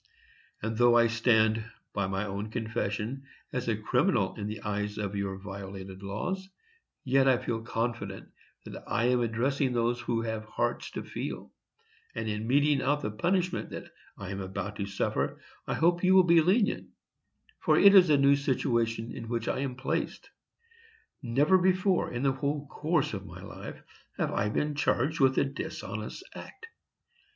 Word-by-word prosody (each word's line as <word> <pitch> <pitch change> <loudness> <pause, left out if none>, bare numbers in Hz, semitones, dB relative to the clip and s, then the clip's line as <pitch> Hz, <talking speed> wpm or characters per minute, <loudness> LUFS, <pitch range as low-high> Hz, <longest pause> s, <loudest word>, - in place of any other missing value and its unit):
And 110 - -1
although 120 +1 +5
I 120 - +6
stand, 110 -1 +3 0.3
by 100 -2 0
my 95 +2 -2
own 100 +1 -4
confession, 115 +2 -3 0.3
as 125 -1 -2
a 110 -3 +1
criminal 125 - +1
in 105 -1 -5
the 110 0 -5
eyes 105 0 -3
of 100 -1 -3
your 100 -1 -2
violated 95 -1 -8
laws, 180 - -4 0.5
yet 135 +1 +3
I 130 -2 +5
feel 120 -2 -3
confident 115 -3 -3 0.4
that - - -8
I 115 - 0
am 125 0 +3
addressing 125 +3 0
those 120 0 +1
who 115 -1 -1
have 110 -1 -3
hearts - - -2
to - - -4
feel; - - -6 0.6
and 115 0 -3
in 105 +1 -3
meting 145 +2 +3
out 145 +3 +1
the 105 - -2
punishment 180 - 0
that - - -8 0.3
I 100 -2 -6
am 100 0 -4
about 100 +2 -5
to 100 - -3
suffer 100 - -1 0.3
I - - -1
hope 175 +2 +2
you 185 +1 +5
will 190 - +8
be 170 -1 +6
lenient, 200 +6 +2 0.7
for - - +3
it 200 0 +8
is 185 -4 +8
a 150 - +6
new 140 0 +5
situation 120 -4 0
in 115 - -7
which 115 -1 -2
I - - 0
am 135 -2 -2
placed. 135 +1 -3 0.9
Never 145 +9 +3
before, 185 +1 +2
in 120 +1 -3
the 135 - +4
whole 140 +2 -2
course 150 -1 0
of 100 -1 -5
my - - -10
life, - - -8 0.4
have - - 0
I 105 - 0
been 150 +7 0
charged 145 +1 +1
with 130 -1 +4
a - - +4
dishonest 115 - -6
act. 440 - -10
120 Hz, 170 wpm, -29 LUFS, 105-145 Hz, 0.9 s, will